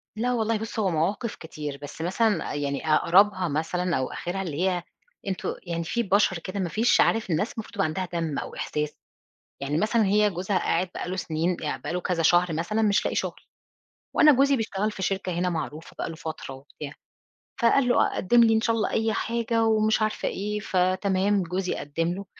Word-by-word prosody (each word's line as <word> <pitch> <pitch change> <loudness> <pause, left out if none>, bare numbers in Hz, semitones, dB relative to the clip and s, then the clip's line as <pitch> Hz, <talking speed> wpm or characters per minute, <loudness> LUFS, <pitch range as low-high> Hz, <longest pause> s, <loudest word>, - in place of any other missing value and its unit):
لا 245 +3 0
والله 225 -1 +1
بُصّ 225 +1 -5
هو 195 -3 +2
مواقف 190 +8 -1
كتير، 150 -3 -7
بس 145 +2 -8
مثلًا 190 0 +1
يعني 145 +1 -3
أقربها 185 +2 +4
مثلًا 170 +3 -1
أو 130 -1 -2
آخرها 185 +2 -4
اللي 165 -5 -4
هي 180 -2 -2 0.4
أنتم 190 - -2
يعني 170 -2 -3
في 235 +8 -1
بشر 195 -2 +3
كده 185 +4 -5
ما 180 - -1
فيش 225 +9 +3
عارف 225 -3 +2
الناس 175 +7 0
المفروض 225 -2 -7
تبقى - - +1
عندها 185 +4 -2
دم 165 -4 -1
أو - - -7
إحساس، 150 0 -3 0.7
يعني 145 +3 -1
مثلًا 220 +1 +2
هي 210 +1 +3
جوزها 185 +2 -1
قاعد 180 +2 0
بقى - - -4
له 185 - -3
سنين 170 0 -1 0.2
بقى - - -5
له 180 - -1
كذا 175 -2 -1
شهر 175 +1 +4
مثلًا 195 +8 -1
مش 205 -1 +3
لاقي - - -1
شغل، - - -2 0.7
وأنا 305 - +7
جوزي 275 +2 +4
بيشتغل 215 -2 -1
في 195 - -8
شركة 190 -1 -1
هنا 180 0 +1
معروفة 160 -1 -5
بقى - - -2
له 165 - -7
فترة 160 -5 -6
وبتاع، 140 +2 -9 0.7
فقال 245 +2 +4
له: 245 - +4
"أ - - -5
قدّم 235 +5 +4
لي 225 - +5
إن 220 - +2
شاء 230 0 +1
الله 220 - 0
أي 225 0 +1
حاجة" 230 0 0
ومش 220 0 +3
عارفة 215 0 0
إيه، 210 +2 -2
فتمام 190 +1 +1
جوزي 180 +2 -2
قدّم 165 +4 -2
له، 200 +2 -6
185 Hz, 200 wpm, -26 LUFS, 165-215 Hz, 0.7 s, وأنا